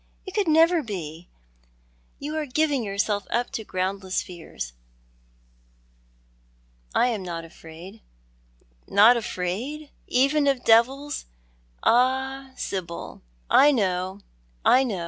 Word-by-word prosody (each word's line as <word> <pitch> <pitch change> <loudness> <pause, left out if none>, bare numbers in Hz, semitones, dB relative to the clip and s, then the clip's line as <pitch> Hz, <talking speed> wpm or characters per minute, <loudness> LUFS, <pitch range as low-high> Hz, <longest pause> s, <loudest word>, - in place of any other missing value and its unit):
It 380 - -8
could 410 -4 0
never 325 +2 +5
be! 175 - -7 0.9
You 300 +2 -5
are 310 -1 -2
giving 290 0 +1
yourself 200 -1 -1
up 240 +1 -1
to 220 - -4
groundless 190 0 -2
fears. 165 - -8 2.2
I 250 - +4
am 220 -4 -2
not 170 -2 -5
afraid 165 +6 -12 0.5
" - - -36
"Not 215 +5 +6
afraid, 235 +9 -4 0.2
even 280 +3 +2
of 270 -3 +1
devils? 265 +6 +3 0.6
Ah, 265 +2 +2
Sibyl, 170 -3 -5 0.3
I 290 +2 +6
know, 190 -4 -1 0.4
I 260 - +6
know! 215 -8 -2
225 Hz, 110 wpm, -25 LUFS, 185-275 Hz, 2.2 s, Not